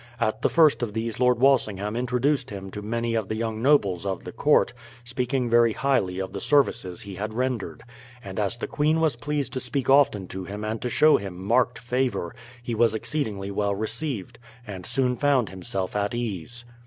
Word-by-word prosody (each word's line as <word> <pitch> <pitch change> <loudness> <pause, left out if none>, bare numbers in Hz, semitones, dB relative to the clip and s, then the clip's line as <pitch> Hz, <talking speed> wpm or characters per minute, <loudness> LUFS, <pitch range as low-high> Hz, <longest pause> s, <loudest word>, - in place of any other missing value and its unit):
At 110 -1 0
the - - +2
first 160 -5 +4
of 115 -4 -2
these 115 0 -3
Lord 125 -1 +4
Walsingham 110 -6 +2
introduced 125 +4 0
him 95 -1 -7
to 105 - -6
many 115 +2 -2
of 110 -3 -1
the 110 - -3
young 110 0 -3
nobles 105 - +3
of 95 -2 -3
the - - -7
court, - - +3 0.3
speaking 125 +1 -1
very 115 -1 +4
highly 100 -10 0
of 95 0 -4
the 100 - -4
services 115 -9 +1
he 100 -1 -8
had 105 +3 -5
rendered; 125 -4 -2 0.4
and 95 0 -6
as 105 +2 0
the - - -3
queen 155 +2 +1
was 160 -5 +2
pleased 140 0 -3
to 130 - -1
speak 130 +1 -1
often 130 -9 +4
to 95 0 -6
him 100 +3 -6
and 110 +1 -3
to 125 - -2
show 155 +5 +5
him 95 -2 -6
marked 115 +5 +1
favour, 120 -6 -1 0.3
he 120 - -3
was 115 -1 +3
exceedingly 105 -6 -3
well 100 0 0
received, 115 +1 -4 0.3
and 95 -3 -7
soon 125 -2 +1
found 140 -6 +2
himself 95 0 -4
at 105 +3 0
ease. 120 +1 -5
115 Hz, 195 wpm, -25 LUFS, 100-130 Hz, 0.4 s, show